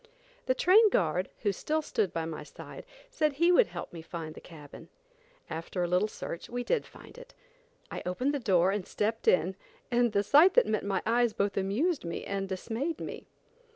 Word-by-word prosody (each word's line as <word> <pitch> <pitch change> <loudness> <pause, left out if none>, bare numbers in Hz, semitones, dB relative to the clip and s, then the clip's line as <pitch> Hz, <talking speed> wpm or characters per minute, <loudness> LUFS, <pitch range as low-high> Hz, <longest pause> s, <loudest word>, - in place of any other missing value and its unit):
The 255 - +2
train 420 - +6
guard 180 - 0
who 205 - +3
still 310 +10 -2
stood 210 - -1
by 165 -1 -3
my 160 -1 -5
side, 150 - -11 0.3
said 305 -10 +1
he 335 +5 +3
would 420 +6 +5
help - - -7
me 165 - -7
find 160 -1 -7
the - - -12
cabin. 160 0 -13 0.6
After 165 +3 -4
a - - 0
little 180 +4 +2
search, 170 -5 -7
we 245 +1 -3
did 485 - 0
find - - -14
it. - - -14 0.6
I - - -5
opened 250 +11 -1
the 285 - -1
door 190 -5 +3
and 200 -2 -3
stepped 220 +2 -2
in, 180 +2 +3 0.4
and 240 -1 +3
the 200 -1 +1
sight 305 - +6
that - - +6
met 215 -1 -1
my 195 -2 -1
eyes 235 0 +2
both 200 -1 -1
amused 235 - 0
me 170 -1 -5
and 195 -1 -3
dismayed 230 - -3
me. - - -7
205 Hz, 195 wpm, -29 LUFS, 180-285 Hz, 0.6 s, train